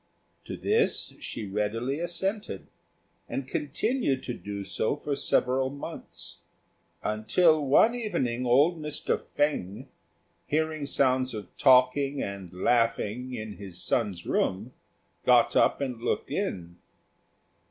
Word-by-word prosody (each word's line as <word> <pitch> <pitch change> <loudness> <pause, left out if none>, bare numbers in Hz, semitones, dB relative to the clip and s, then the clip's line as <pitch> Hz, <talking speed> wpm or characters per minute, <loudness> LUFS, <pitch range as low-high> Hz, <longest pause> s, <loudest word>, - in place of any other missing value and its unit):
To - - -6
this 440 +1 +2
she 110 - -5
readily 110 +7 -2
assented, 175 - -2 0.6
and 135 -1 -3
continued 150 - -1
to 125 - -4
do 100 -3 -6
so 110 - -1
for 145 -1 -3
several 130 0 +1
months, 140 +1 -7 0.6
until 150 +10 +3
one 145 - +5
evening 165 - -1
old 145 +7 +3
Mr. 150 -1 -2
Fêng, 125 -10 -1 0.6
hearing 155 -1 -1
sounds 130 -3 +2
of 100 -5 -8
talking 135 +2 +4
and 100 -3 -5
laughing 115 +4 0
in 110 -2 -6
his 95 -3 -8
son's 100 -5 -1
room, 105 +7 -1 0.5
got - - +4
up - - +3
and 125 -4 -3
looked 120 - -2
in. 90 - -3
130 Hz, 115 wpm, -28 LUFS, 105-150 Hz, 0.6 s, one